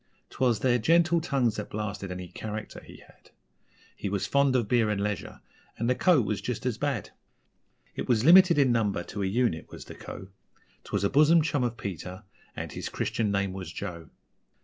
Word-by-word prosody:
'Twas 120 -4 +1
their 125 -1 +3
gentle 170 +6 +3
tongues 130 -8 0
that 105 - -5
blasted 100 -2 -4
any 90 0 -6
'character' 105 +4 -7
he - - -14
had - - -22 0.7
He 100 - -4
was 100 -1 -1
fond 140 -1 +2
of 120 -4 +1
beer 115 -1 +2
and 105 -2 -1
leisure 105 -1 -4 0.4
and 115 - -1
the 125 - +3
Co. 175 +3 +4
was 105 -1 -2
just 125 -1 -4
as 120 -3 -1
bad. 140 -9 -2 0.8
It - - -5
was 120 -1 +2
limited 180 0 +7
in 135 -3 +4
number 105 -6 0
to 100 - -6
a 95 - 0
unit, 105 -5 0
was - - -10
the - - -10
Co. 95 - -9 0.6
'Twas - - -2
a 100 - +2
bosom 155 +3 +5
chum 145 -4 0
of 120 -1 -2
Peter 95 -1 -6 0.3
and - - -5
his - - -5
Christian 110 -2 -1
name 100 -1 0
was 95 -1 -7
Joe. 85 -2 -7
110 Hz, 195 wpm, -27 LUFS, 100-135 Hz, 0.8 s, limited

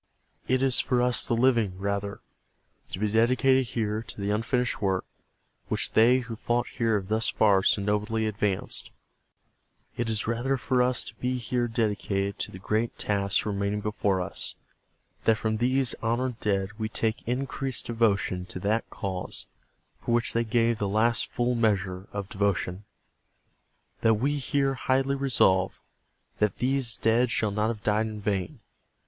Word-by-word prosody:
It 130 +1 +2
is 130 -2 +5
for 125 -2 +1
us 125 0 +3
the 120 - +1
living, 115 -6 +2
rather, 100 +1 -3 0.7
to - - -5
be 105 +1 -1
dedicated 130 +3 +3
here 110 -2 -1
to 115 - -7
the 100 +1 -1
unfinished 120 +3 0
work 95 -2 0 0.6
which - - -1
they 125 +4 +5
who 115 -2 -6
fought 120 +2 0
here 115 -2 0
have 95 -2 -5
thus 110 +2 +1
far 100 -3 +4
so 100 +1 +2
nobly 105 +2 0
advanced. 105 -2 -1 1.1
It 120 -1 -2
is 110 -1 -1
rather 120 +4 0
for 125 0 +1
us 125 0 +1
to - - -10
be 125 0 -1
here 120 0 -1
dedicated 100 -3 -1
to - - -2
the - - -9
great 110 +5 -1
task 100 -1 0
remaining 100 0 -1
before 100 -2 0
us.. 90 - -3 0.7
.that 110 -1 +4
from 110 0 -1
these 130 +2 +1
honored 120 +1 -1
dead 100 +1 -1
we 110 0 -2
take 110 0 -1
increased 130 +1 -2
devotion 100 -6 0
to 90 - -6
that 110 +4 0
cause 95 -2 -5 0.5
for 120 - 0
which 120 - 0
they 115 - +2
gave 115 0 +1
the 100 - -1
last 115 +3 +2
full 120 +1 0
measure 100 -5 0
of 100 -2 -4
devotion... 100 -1 -1 1.1
that 115 -1 +4
we 140 +6 0
here 135 0 +1
highly 135 +1 +1
resolve 115 -9 +2 0.6
that 105 -2 +1
these 130 -2 0
dead 115 +2 +2
shall 110 -5 0
not 105 +2 0
have 110 -2 -4
died 110 +1 +1
in 110 -1 -6
vain. 105 - -2
110 Hz, 160 wpm, -27 LUFS, 100-120 Hz, 1.1 s, is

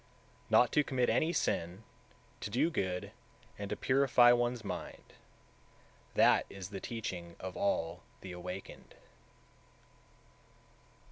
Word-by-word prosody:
183. - - +6
Not 125 - +5
to 150 - +3
commit 130 -3 0
any 160 - +2
sin, 90 - -1 0.6
to - - -5
do 140 +10 +1
good, 90 - -2 0.5
and 100 -1 -4
to - - -1
purify 130 -2 +5
one's 120 -1 +1
mind, 100 - -7 1.0
that - - +5
is 95 -1 -8
the 100 - -5
teaching 90 -7 -5
of 95 0 -6
(all) 140 - -1 0.2
the 95 - -8
Awakened. 90 +2 -8
105 Hz, 120 wpm, -33 LUFS, 90-125 Hz, 1.0 s, 183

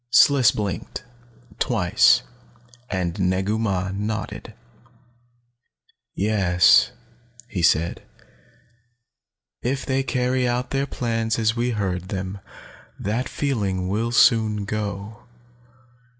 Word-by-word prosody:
Sliss 130 -1 +6
blinked, 105 -3 -4 0.6
twice, 85 - +3 0.7
and 90 -1 -2
Negu 95 +3 0
Mah 95 -4 -1
nodded. 105 +2 -5 1.6
"Yes," 90 - +4 0.6
he 100 -7 -4
said. 85 0 +2 1.6
"If 130 +2 -2
they 135 0 0
carry 125 -1 0
out 125 +1 -2
their 135 +1 0
plans 115 -3 -2
as 110 0 +1
we 120 +1 0
heard 95 -5 -3
them, 95 0 -4 0.6
that 115 +6 -2
feeling 100 -10 -2
will 110 +4 -1
soon 110 -3 +3
go. 105 0 -5
105 Hz, 95 wpm, -23 LUFS, 95-120 Hz, 1.6 s, Sliss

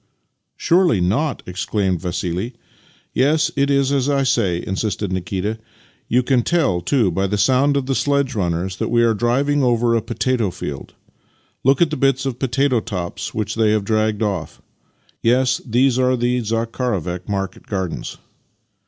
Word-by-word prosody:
" - - -54
Surely 170 - +3
not? 120 - 0
" - - -39
exclaimed 95 -1 -1
Vassili. 90 +5 -3 0.3
" - - -33
Yes, 150 +5 +2
it 140 0 +1
is 140 -1 +2
as 140 -1 +1
I 140 -1 +2
say," 100 -9 +1
insisted 100 0 -2
Nikita. 95 +4 -3 0.2
" - - -34
You 125 +2 +3
can 125 -1 +2
tell, 135 - +1
too, 115 -4 +1
by 95 +3 0
the 105 +2 -1
sound 135 +6 +3
of 135 - -1
the 135 - -1
sledge 140 -1 +1
runners 90 -2 -2
that - - -2
we 120 0 +3
are 115 -1 +3
driving 135 +6 +1
over 120 -2 +2
a 115 - +2
potato 115 -1 -1
field. 75 -6 -7 0.7
Look 135 +5 +4
at 160 - -1
the 155 - -2
bits 135 -1 +1
of 130 -3 -3
potato 135 0 +1
tops 90 -6 -5
which 110 -1 -2
they 110 -1 +2
have 105 -2 0
dragged 110 0 +1
off. 95 -7 -3 0.6
Yes, 125 +2 +2
these 125 +2 +2
are 130 0 +2
the 125 +1 +1
Zakharovek 110 -6 -2
market 95 -2 -4
gardens." 95 -4 -4
115 Hz, 170 wpm, -20 LUFS, 95-135 Hz, 0.7 s, Look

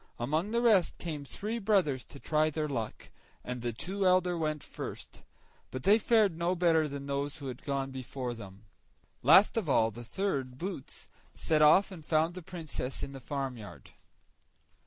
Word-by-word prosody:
Among 155 - -1
the 235 +2 +1
rest 205 -8 +4
came 155 -4 -5
three 215 +10 -3
brothers 190 - +2
to 140 - -12
try 155 +1 +2
their 155 0 -2
luck, 120 -7 -5 0.3
and 125 -1 -5
the 120 0 -1
two 190 - -3
elder 180 -1 +3
went 155 -2 -2
first, - - -8 0.5
but 130 0 -6
they 210 +3 +6
fared 215 -6 +3
no 170 +2 0
better 165 -3 +3
than 140 -1 -6
those 140 +1 -2
that 145 - -9
had 125 -1 -6
gone 135 -2 -2
before 130 -1 -5
them. 100 -3 -11 0.6
Last 180 - +6
of 200 -9 -1
all, 115 -4 +3
the 120 +3 -8
third, 130 - -2
Boots, 175 -4 -6 0.3
set 155 -1 +1
off 170 +7 +6
and 170 -5 -9
found 160 +2 +1
the 185 - -7
Princess 160 -6 -5
in 140 - -5
the 135 - -8
farmyard. 130 -5 -6
150 Hz, 175 wpm, -31 LUFS, 130-180 Hz, 0.6 s, they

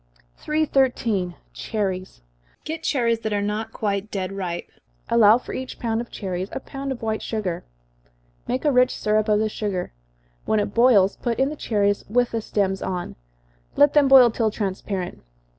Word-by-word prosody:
313. 255 - 0 0.2
Cherries. 190 - -3 0.4
Procure 320 +1 -4
cherries 235 -7 +1
that 220 -1 -3
are 205 - +1
not 210 +2 -2
quite 200 -1 -2
dead 190 -2 -3
ripe 180 -3 -4 0.4
allow 225 -1 +6
for 250 - -8
each 260 0 -5
pound 230 -1 -1
of 235 - -8
cherries 185 -1 -4
a - - -3
pound 275 +1 -6
of 245 -3 -6
white 220 -1 -1
sugar. 200 -6 -3 0.8
Make 255 +4 -2
a 295 - +4
rich 250 -1 +3
syrup 215 0 +1
of 210 - +4
the 215 +1 +1
sugar 205 - -3 0.5
when 215 - +2
it 205 -1 -2
boils, 230 -5 +4
put 235 -2 -2
in 270 +1 +2
the 305 - -5
cherries, 205 -6 0
with 245 +2 +2
the 230 - -2
stems 195 -3 -1
on 180 -2 -4 0.6
let 290 0 +5
them 295 -2 +5
boil 260 -3 +8
till 225 -1 +1
transparent. 195 -3 -4
215 Hz, 170 wpm, -23 LUFS, 200-245 Hz, 0.8 s, boil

